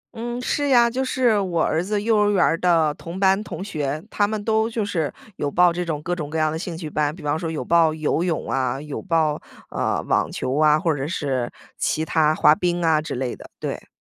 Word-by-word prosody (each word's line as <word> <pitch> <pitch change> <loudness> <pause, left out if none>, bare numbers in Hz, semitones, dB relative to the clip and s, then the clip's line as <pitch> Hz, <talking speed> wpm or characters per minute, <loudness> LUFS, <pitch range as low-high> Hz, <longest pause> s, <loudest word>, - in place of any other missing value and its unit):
嗯， 240 +2 -4
是 290 +1 0
呀， 240 -3 +6
就 260 +2 -1
是 245 -5 +2
我 175 -4 0
儿 160 +2 +1
子 205 +2 -1
幼 220 +1 +1
儿 205 0 +3
园 200 -3 +3
儿 - - +2
的 165 -4 +3
同 170 +5 -8
班 195 +1 +3
同 190 - -6
学， 150 -5 -3
他 205 -1 +2
们 215 -1 -3
都 220 0 +1
就 225 -3 -2
是 165 -7 -1 0.3
有 145 - -1
报 175 +2 +4
这 180 +1 -2
种 155 -4 -3
各 175 +1 -1
种 150 -4 -5
各 160 - -3
样 155 -1 +2
的 160 - -3
兴 170 -2 -5
趣 160 -3 -6
班。 150 0 -1
比 175 - -12
方 145 +1 0
说 165 - -3
有 150 -6 -4
报 165 -1 +4
游 155 +2 0
泳 170 -3 -2
啊， 130 0 0
有 150 -1 -6
报， 160 -5 0 0.3
呃， - - -1
网 - - +1
球 130 - -2
啊， 155 0 +5
或 165 -5 +1
者 135 +1 -3
是 135 -8 -2 0.3
其 160 +1 0
它 155 -1 +2
滑 - - +6
冰 175 +1 -1
啊 155 -1 +3
之 155 - -5
类 125 -1 -3
的， - - -13
对。 - - -5
165 Hz, 255 characters per minute, -22 LUFS, 150-200 Hz, 0.3 s, 呀